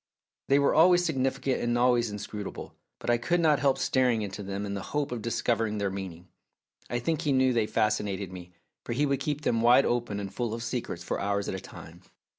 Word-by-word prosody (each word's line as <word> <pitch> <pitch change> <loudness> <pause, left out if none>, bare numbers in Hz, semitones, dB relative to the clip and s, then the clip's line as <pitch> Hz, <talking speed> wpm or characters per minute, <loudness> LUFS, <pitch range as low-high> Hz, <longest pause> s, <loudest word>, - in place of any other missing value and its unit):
They 140 - +4
were 140 0 +3
always 175 +2 +5
significant 135 -3 0
and 120 0 0
always 120 -2 +3
inscru 105 0 -6
table, - - -8 0.2
but - - -1
I 120 - +2
could 175 +8 +1
not 155 -3 +3
help 135 -2 +2
staring 125 -4 +2
into 100 0 -5
them 100 +1 -4
in 100 - -4
the 100 - -3 0.2
hope 145 -3 -1
of 120 -2 -3
discovering 115 -1 0
their 100 -2 -1
meaning. 95 -2 -7 0.6
I 120 - -1
think 155 +6 -1
he 150 - 0
knew 130 -1 +3
they 115 -3 +1
fascinated 105 -3 -1
me, 90 -1 -10 0.3
for - - -4
he 145 +5 +1
would 140 -2 0
keep 145 +1 -2
them 115 -6 +1
wide 120 +3 +6
open 120 -4 -1
and 100 -1 -6
full 115 -1 -2
of 115 - -6
secrets 120 -8 -4
for - - -3
hours 100 0 -1
at - - -2
a 95 - -3
time. - - -12
120 Hz, 225 wpm, -28 LUFS, 100-135 Hz, 0.6 s, wide